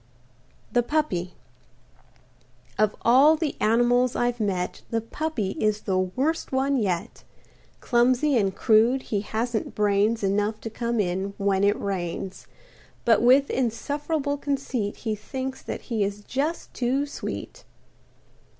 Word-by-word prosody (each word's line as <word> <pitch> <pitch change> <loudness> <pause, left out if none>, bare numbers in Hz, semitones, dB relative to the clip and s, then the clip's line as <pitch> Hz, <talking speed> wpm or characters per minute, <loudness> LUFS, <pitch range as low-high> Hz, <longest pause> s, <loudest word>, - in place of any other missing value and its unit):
THE 245 - +3
PUPPY 235 - -1 1.4
Of 215 -1 +2
all 270 +6 +6
the 315 -2 -2
animals 240 +3 +3
I've 240 0 0
met 190 -4 -2
The 230 - 0
Puppy 230 -3 -3
is 215 -1 +1
the 190 -2 0
worst 260 - -1
one 270 +1 +1
yet. 185 -7 -2 0.6
Clumsy 255 +4 +3
and 195 -5 +1
crude, 235 +3 +3
he 205 -2 -2
hasn't 225 +2 -3
brains 210 +2 +2
Enough 205 +2 0
to 225 - -6
come 235 0 -2
in 190 +1 -1
when 195 -1 +1
it 205 +1 +3
rains. 190 -1 -4 0.6
But 230 - +5
with 260 +4 +5
insufferable 285 +4 -1
conceit 270 -7 -2
He 220 - +1
thinks 260 +5 -5
that - - -6
he 225 -4 -1
is 205 +1 -3
just 290 +9 -3
too 260 +3 0
sweet. - - -6
230 Hz, 130 wpm, -25 LUFS, 205-265 Hz, 1.4 s, all